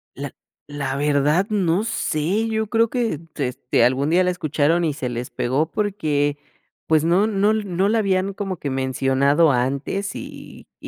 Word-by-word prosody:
La - - -6 0.4
la 140 -2 -3
verdad, 150 +6 +2
no 190 -2 +1
sé, 195 +1 -1
yo 220 -1 -1
creo 230 +1 +2
que 240 -4 -1
eh, 150 - -6 0.2
este 125 -3 0
algún 130 +4 +2
día 180 +3 +4
la 180 - +1
escucharon 160 0 +1
y 150 - 0
se 130 -3 -4
les 120 +1 -5
pegó 140 +6 -1
porque 150 -9 0 0.5
pues 155 -1 +3
no 185 +5 +3
no 205 0 +2
no 200 -3 0
la 225 +1 +2
habían 195 -1 0
como 195 -2 -4
que 145 - -4
mencionado 135 +3 +2
antes 140 +10 -1
y - - -10
y - - -9
160 Hz, 170 wpm, -22 LUFS, 140-200 Hz, 0.5 s, día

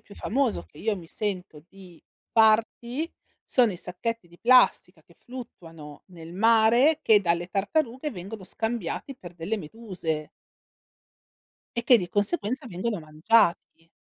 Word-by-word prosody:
più 200 - -16
famoso 260 0 -1
che - - -24
io 220 -1 0
mi 170 -3 -10
sento 185 -7 -5
di 185 -4 -15 0.3
farti, 230 +7 +2 0.3
sono 240 -5 +2
i - - -7
sacchetti 190 +2 -5
di 175 - -19
plastica 250 +1 +4
che - - -24
fluttuano 165 - -11
nel 170 -2 -11
mare, 230 - +4
che 220 -8 +5
dalle 170 -1 0
tartarughe 255 - -1
vengono 195 +1 -8
scambiati 225 +5 -4
per 175 -7 -11
delle 175 +6 -3
meduse 170 -5 -5 1.5
e 235 - 0
che 245 +1 +6
di 180 -3 -4
conseguenza 210 - -1
vengono 205 +1 -3
mangiati. 165 +2 +1
210 Hz, 135 wpm, -26 LUFS, 175-235 Hz, 1.5 s, che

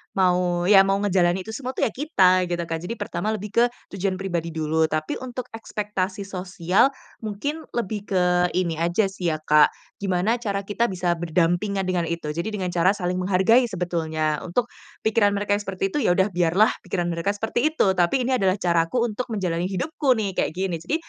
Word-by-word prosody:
mau, 180 -2 +2
ya 195 +2 +7
mau 195 - +3
ngejalanin 185 -2 +2
itu 220 - -8
semua 255 +3 -5
tuh - - -1
ya - - +2
kita 185 - +3
gitu 175 0 -2
kan. 165 -1 -3
Jadi 180 +8 -5
pertama 210 +1 -2
lebih 210 0 -7
ke 235 +3 +4 0.3
tujuan 195 0 -1
pribadi 175 -3 -3
dulu, 160 0 0
tapi 155 0 -2
untuk 255 -1 -5
ekspektasi 210 -3 -3
sosial 185 +1 +1 0.3
mungkin 260 +9 -4
lebih 210 -3 -3
ke 180 -1 +3
ini 170 -3 0
aja 175 +4 +1
sih 185 -2 -4
ya 160 - +1
Kak, 150 -1 +6 0.3
gimana 200 +4 0
cara 200 -4 -2
kita 210 +4 0
bisa 180 -4 -1
berdampingan 175 +4 0
dengan 180 -2 -1
itu. 165 -2 -3
Jadi 170 +5 -3
dengan 185 -3 -2
cara 180 +3 +3
saling 180 -1 -2
menghargai 195 +7 +3
sebetulnya 160 -6 -1
untuk 220 +7 -2 0.3
pikiran 215 -2 +3
mereka 205 0 0
seperti 195 -1 -3
itu, 295 - -1
ya 175 - +4
udah 190 +2 +2
biarlah 180 +4 +3 0.2
pikiran 175 -1 -1
mereka 170 +5 -1
seperti 225 +6 0
itu, 195 - +3
tapi 185 +8 +2
ini 255 +1 +1
adalah 190 -2 +2
caraku 175 +4 +1
untuk 240 +2 -3
menjalani 180 -6 -1
hidupku 255 - 0
nih, 210 -4 -1
kayak 175 - -2
gini. 185 -2 -2
Jadi 175 - -2
185 Hz, 190 wpm, -24 LUFS, 175-210 Hz, 0.3 s, ya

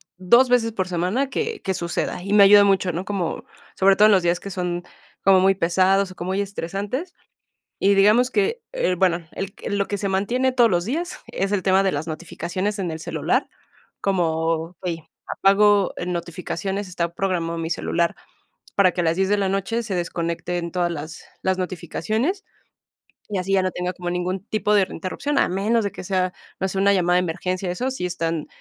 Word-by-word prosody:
2 235 +8 +5
veces 245 -2 +2
por 190 -4 -2
semana 185 +10 -1
que 450 +7 -3
que 190 - -1
suceda, 175 0 -3
y 195 - -5
me 205 -1 +7
ayuda 205 +1 +8
mucho, 195 -2 +2
¿no?, 170 +3 -3
como, 195 -5 -3 0.3
sobre 195 0 +4
todo, 210 - +7
en 215 - +6
los 190 -2 +3
días 175 0 +1
que 200 - -8
son 180 -2 -3 0.4
como 190 -1 +6
muy 195 +1 +4
pesados 190 +2 +2
o - - -12
como 175 +1 -5
muy 190 +1 0
estresantes, 200 - -4 0.6
y 200 +1 +3
digamos 210 +6 +4
que, 425 +4 +1
eh, - - 0
bueno, 175 -2 +2
el 195 0 -5 0.2
lo 200 - 0
que 205 - -3
se 200 - -1
mantiene 235 +7 +1
todos 240 -3 +4
los 175 -1 +1
días 330 - -3
es 195 +1 -2
el 205 -2 +1
tema 190 +1 +3
de 190 - +2
las 150 +1 -3
notificaciones 175 +5 -4
en 185 -3 -2
el 160 0 -5
celular, - - -1 0.5
como: 165 -2 0
"Hey, 165 -3 -3 0.2
apago 200 0 +3
notificaciones," 180 +3 -3
está 170 -1 -3
programado 170 -3 -1
mi 165 0 -3
celular 170 0 0 0.6
para 190 -2 +4
que - - -2
a - - 0
las 165 0 +1
10 190 0 +1
de 205 - +3
la 195 -1 +1
noche 195 +5 -1
se 210 -4 -4
desconecten 170 0 -3
todas 175 -1 0
las 155 0 -7 0.2
las 190 0 +1
notificaciones, 215 - -2 0.8
y 205 - -2
así 185 +1 -2
ya 195 -1 +4
no 185 - 0
tenga 180 0 -3
como 180 -1 -6
ningún 180 +2 -2
tipo 210 -1 0
de 200 -2 +4
interrupción, 190 - -3
a - - +4
menos 210 +5 +1
de 200 - -2
que - - -8
sea, 185 -1 0 0.3
no 190 - +1
sé, 190 - -3
una 200 +1 +4
llamada 180 -1 +2
de - - +4
emergencia, 180 +2 -2
eso 250 +9 -2
sí 255 -9 -3
están 165 -2 -2
190 Hz, 200 wpm, -23 LUFS, 175-205 Hz, 0.8 s, ayuda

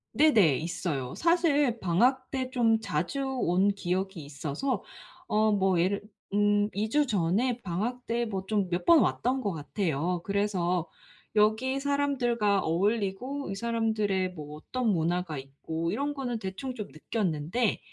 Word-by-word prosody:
네네. 215 - +5
있어요. 165 -6 -3
사실 295 -8 +2
방학 245 +9 +2
때 260 -1 -2
좀 230 -4 +3
자주 175 - -2
온 200 -7 +2
기억이 190 -3 -2
있어서 145 - -3 0.4
어 215 0 +3
뭐 190 -3 +2
예를 195 +4 +1 0.3
음 205 0 +3
2 210 +3 -1
주 295 +5 +3
전에 225 +4 +1
방학 220 +8 -3
때 235 +1 0
뭐 195 -4 -3
좀 205 -3 +1
몇 175 0 -2
번 335 -2 +7
왔던 255 +2 +1
것 200 -4 -1
같아요. 165 +1 -2
그래서 185 -4 0 0.5
여기 220 +6 +3
사람들과 250 -8 +1
어울리고 205 - -1
이 - - -3
사람들의 215 -4 0
뭐 150 -3 -8
어떤 250 +9 -3
문화가 170 -2 0
있고 160 +5 -4
이런 290 +1 -2
거는 245 -4 -3
대충 205 +7 -5
좀 215 -4 -6
느꼈는데 180 - -1
205 Hz, 260 characters per minute, -28 LUFS, 175-245 Hz, 0.5 s, 번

